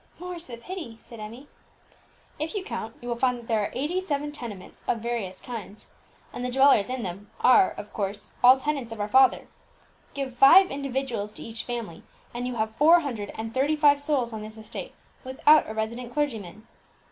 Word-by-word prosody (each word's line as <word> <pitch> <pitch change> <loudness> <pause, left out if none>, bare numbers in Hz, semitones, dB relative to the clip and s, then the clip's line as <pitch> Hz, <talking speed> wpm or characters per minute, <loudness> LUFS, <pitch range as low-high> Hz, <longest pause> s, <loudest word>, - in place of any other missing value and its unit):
"More's 355 -1 -7
the 240 -2 -8
pity!" 305 -3 -7
said 230 0 -12
Emmie. 230 +6 -9 0.9
"If 310 +6 -3
you 400 - -2
count, 225 - -5
you - - -7
will 240 - -1
find 250 +1 +1
that 235 - -11
there 225 -2 +1
are 205 - -1
eighty 320 +8 -1
seven 295 -4 -2
tenements 230 -10 -9
of - - +1
various 220 -5 -4
kinds, 215 -4 -8 0.5
and 245 - -5
the 250 - -1
dwellers 265 -5 +4
in 255 -2 -3
them 195 +3 -6
are, 250 -6 +6
of 205 - -10
course, 200 0 -4
all 255 +2 +9
tenants 275 -4 -2
of 225 - -7
our 205 - -1
father. 260 +4 +4 0.7
Give 270 -3 -4
five 325 +10 +7
individuals 265 -6 -3
to - - -9
each 230 0 -6
family, 230 -9 -5 0.3
and 245 +1 -3
you 250 - -4
have 220 -1 -2
four 330 +4 +6
hundred 230 -9 -4
and 225 +1 -5
thirty 280 +5 +2
five 290 -1 +5
souls 270 -6 0
on 220 - -5
this 215 +1 -9
estate, 220 - -8 0.3
without 265 +3 +4
a - - -4
resident 235 +3 -3
clergyman." 225 - -3
245 Hz, 195 wpm, -26 LUFS, 220-280 Hz, 0.9 s, all